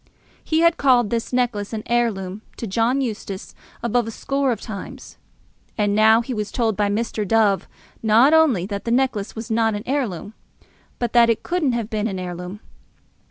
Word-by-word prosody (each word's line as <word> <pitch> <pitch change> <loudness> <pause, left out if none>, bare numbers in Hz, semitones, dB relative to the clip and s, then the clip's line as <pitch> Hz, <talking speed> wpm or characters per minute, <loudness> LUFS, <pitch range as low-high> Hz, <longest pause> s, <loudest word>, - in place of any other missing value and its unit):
He 315 0 +1
had 335 0 +4
called 245 -6 +3
this 230 -1 -2
necklace 235 -5 -1
an 215 -1 -4
heirloom 215 -5 -1 0.2
to - - -4
John 230 +6 +1
Eustace 205 -5 -5 0.3
above 235 0 +1
a - - -3
score 275 +4 -1
of 225 - -2
times; 205 -5 -8 0.6
and 205 -2 +1
now 220 +2 +5
he 250 +2 -5
was 210 -3 -3
told 225 -4 0
by 205 0 +1
Mr. 215 +1 -1
Dove 205 -1 +2 0.3
not 230 +7 +5
only 290 - +4
that 200 0 -5
the - - -2
necklace 240 -4 0
was 225 0 -6
not 225 -1 +2
an 205 - -5
heirloom, 225 - -2 0.6
but 240 -2 -2
that 235 -1 +6
it 230 - 0
couldn't 335 -7 0
have 230 -1 -3
been 215 0 -1
an 195 -4 -4
heirloom. 180 +2 -6
225 Hz, 180 wpm, -22 LUFS, 205-245 Hz, 0.6 s, that